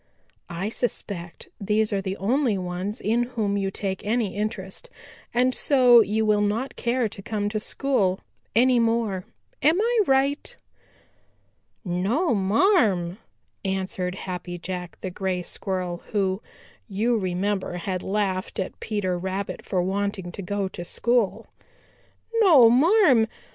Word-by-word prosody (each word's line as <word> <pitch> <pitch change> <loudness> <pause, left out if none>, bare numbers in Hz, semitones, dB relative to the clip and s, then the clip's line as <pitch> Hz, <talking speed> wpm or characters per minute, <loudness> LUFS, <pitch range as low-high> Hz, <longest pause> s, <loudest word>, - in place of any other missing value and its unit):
I 175 +5 -3
suspect 200 -7 -4
these 210 +1 +1
are 195 - 0
the 190 0 -4
only 235 +1 +1
ones 185 +4 -4
in 230 +3 +1 0.2
whom 205 -2 +1
you 195 -1 0
take 195 -1 -3
any 215 -2 0
interest, 210 - -4 0.4
and 255 +1 +2
so 250 -4 +6
you 220 +1 0
will 210 -1 +3
not 215 +6 -1
care 240 0 0
to 195 - -8
come 205 0 -2
to 215 0 -2
school 210 -6 0 0.4
any 250 +1 +5
more. 225 -5 0 0.4
Am 315 +7 +4
I 465 +2 +2
right?" 275 +2 +1 1.3
"No, 200 - +1
marm," 200 - +2 0.4
answered 190 -1 -2
Happy 180 -1 -5
Jack 180 0 -6
the 185 - -4
Gray 185 -1 -2
Squirrel, 180 -2 -3
who, 195 -1 0 0.5
you 220 +5 +1
remember, 190 +1 -1
had 180 +1 -3
laughed 190 -2 -2
at 190 - -4
Peter 190 -5 -2
Rabbit 190 +2 -4
for 185 -3 0
wanting 195 -1 -2
to 195 - -7
go 200 +1 -2
to 175 - -7
school. 235 +3 0 1.0
"No, 285 - +7
marm. 280 - +5
205 Hz, 135 wpm, -25 LUFS, 185-235 Hz, 1.3 s, No